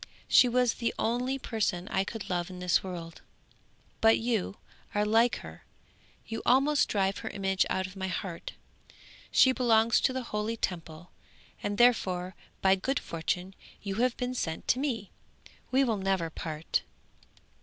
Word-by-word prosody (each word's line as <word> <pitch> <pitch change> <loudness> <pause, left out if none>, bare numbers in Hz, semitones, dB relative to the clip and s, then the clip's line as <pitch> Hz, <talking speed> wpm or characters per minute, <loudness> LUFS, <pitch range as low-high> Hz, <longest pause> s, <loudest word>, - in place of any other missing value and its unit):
She 250 - +6
was 245 -1 +2
the 235 - -2
only 250 +4 0
person 210 -8 -2
I 190 - +1
could 215 +1 -6
love 175 -1 -2
in 185 - -8
this 180 -1 +2
world, 170 -3 -7 0.8
but 225 0 +6
you 225 -4 -1 0.4
are 210 0 +2
like 225 +3 +4
her, - - -11 0.6
you 225 0 -5
almost 280 +4 +3
drive 195 -1 0
her - - -5
image 190 -1 0
out 190 - 0
of 185 +1 -9
my 190 -1 -3
heart. 180 -1 -5 0.8
She 260 - +6
belongs 230 -3 +3
to - - +3
the 260 0 -3
holy 215 0 -3
Temple, 165 -3 -5 0.5
and 205 0 -2
therefore 190 -7 +3 0.3
by 190 0 +6
good 255 +8 -1
fortune 180 +3 -3 0.3
you 200 -1 -3
have 250 -1 +1
been 250 0 -2
sent 160 -10 -3
to 250 - +3
me; 235 -8 -2 0.6
we 265 +1 +3
will 230 -5 +1
never 190 -4 0
part!' 155 0 -2
205 Hz, 155 wpm, -29 LUFS, 185-240 Hz, 0.8 s, She